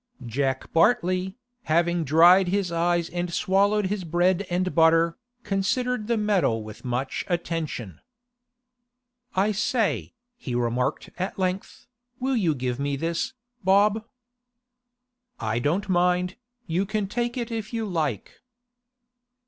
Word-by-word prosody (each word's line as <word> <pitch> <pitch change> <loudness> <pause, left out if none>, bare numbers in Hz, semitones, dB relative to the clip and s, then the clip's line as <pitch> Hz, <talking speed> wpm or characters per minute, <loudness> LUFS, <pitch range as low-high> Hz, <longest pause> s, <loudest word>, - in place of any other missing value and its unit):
Jack 130 +3 -2
Bartley, 185 0 +2 0.3
having 170 +1 +2
dried 170 +6 +6
his 190 -1 0
eyes 170 0 +1
and 175 0 -3
swallowed 200 +3 +2
his 195 0 -2
bread 175 +3 +1
and 180 +1 0
butter, 165 0 +4 0.3
considered 215 +4 -1
the 235 -1 +1
medal 195 - +1
with 110 0 -11
much 125 +2 -2
attention. 165 - -3 1.3
'I 200 +3 +3
say,' 220 +3 0 0.2
he 130 - -5
remarked 120 +1 -1
at 185 +2 -3
length, 185 0 -3 0.3
'will 265 +1 0
you 175 -10 +2
give 125 -1 -3
me 140 0 -1
this, 165 - -2 0.3
Bob?' 200 +3 +4 1.4
'I 110 +1 -1
don't 165 +11 0
mind, 180 0 +1 0.3
You 185 +3 -1
can 215 -1 -1
take 240 +4 -2
it 235 -1 -3
if 225 -1 -4
you 225 -2 -2
like. 155 - -3
180 Hz, 125 wpm, -25 LUFS, 160-200 Hz, 1.4 s, dried